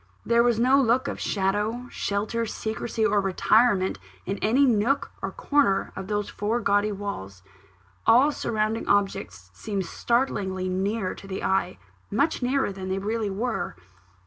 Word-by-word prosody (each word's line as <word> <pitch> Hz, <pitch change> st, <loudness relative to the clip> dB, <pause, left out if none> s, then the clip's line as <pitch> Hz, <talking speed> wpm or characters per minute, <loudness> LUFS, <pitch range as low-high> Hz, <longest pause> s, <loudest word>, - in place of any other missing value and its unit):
There 235 Hz, 0 st, +4 dB
was 235 Hz, -2 st, +2 dB
no 260 Hz, +3 st, +5 dB
look 255 Hz, +2 st, +2 dB
of -, -, -4 dB
shadow, 210 Hz, +5 st, -1 dB
shelter, 215 Hz, +3 st, -2 dB
secrecy, 220 Hz, +1 st, -2 dB
or 210 Hz, -1 st, +3 dB
retirement 195 Hz, +1 st, +2 dB, 0.3 s
in 195 Hz, +2 st, -3 dB
any 255 Hz, +7 st, +3 dB
one 235 Hz, -5 st, +3 dB
nook 260 Hz, +7 st, 0 dB
or -, -, -2 dB
corner 290 Hz, -, +1 dB
of 190 Hz, -, -6 dB
those 210 Hz, 0 st, -1 dB
four 215 Hz, +3 st, -1 dB
gaudy 205 Hz, -1 st, +2 dB
walls. 100 Hz, -, -6 dB, 0.6 s
All 260 Hz, +6 st, +6 dB
surrounding 220 Hz, -4 st, -1 dB
objects 95 Hz, -, 0 dB
seemed 195 Hz, -, -3 dB
startlingly 195 Hz, -6 st, -1 dB
near 195 Hz, +2 st, -1 dB
to 195 Hz, -, -12 dB
the 190 Hz, -1 st, -5 dB
eye; 190 Hz, -1 st, 0 dB, 0.3 s
much 280 Hz, +9 st, +1 dB
nearer 255 Hz, -2 st, +1 dB
than 190 Hz, -1 st, -6 dB
they 190 Hz, -, -1 dB
really 215 Hz, +2 st, -2 dB
were. 225 Hz, +5 st, -3 dB
210 Hz, 150 wpm, -25 LUFS, 195-235 Hz, 0.6 s, All